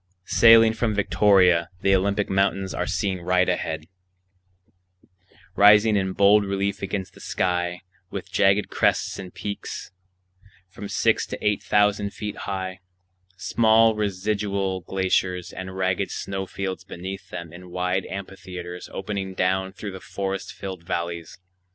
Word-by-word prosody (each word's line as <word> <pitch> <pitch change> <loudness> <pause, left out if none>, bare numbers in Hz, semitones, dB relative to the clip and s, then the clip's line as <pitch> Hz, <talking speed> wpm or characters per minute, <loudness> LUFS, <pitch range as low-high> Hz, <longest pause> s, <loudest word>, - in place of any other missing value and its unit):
Sailing 115 -1 +7
from 110 -1 -1
Victoria, 95 -3 +4
the 100 - +3
Olympic 100 +2 +1
Mountains 95 0 0
are - - -2
seen 95 0 -1
right 90 +1 +2
ahead, 80 -3 -2 1.7
rising 105 +2 +6
in 95 -1 0
bold 100 +2 +5
relief 100 0 -2
against 95 -2 -4
the - - -16
sky, 90 -1 -1 0.3
with - - -7
jagged 100 +1 +3
crests - - +1
and 95 -2 -8
peaks 100 -2 -6 0.8
from 100 +2 -8
six - - +1
to - - -5
eight 105 -1 +1
thousand 105 -1 +1
feet 105 -1 -5
high,—small 95 +4 0
residual 100 -1 -1
glaciers 90 -1 -1
and 95 0 -7
ragged 95 +1 0
snow 95 -1 -4
fields 95 -1 -4
beneath 95 +1 -7
them 85 -2 -7
in 90 +1 -11
wide 90 +1 -1
amphitheatres 90 -2 -7
opening 95 -1 -4
down 95 +1 0
through 100 +1 -7
the 95 - -8
forest 95 +1 -4
filled 95 -3 -7
valleys. 85 -1 -4
95 Hz, 130 wpm, -24 LUFS, 90-100 Hz, 1.7 s, Sailing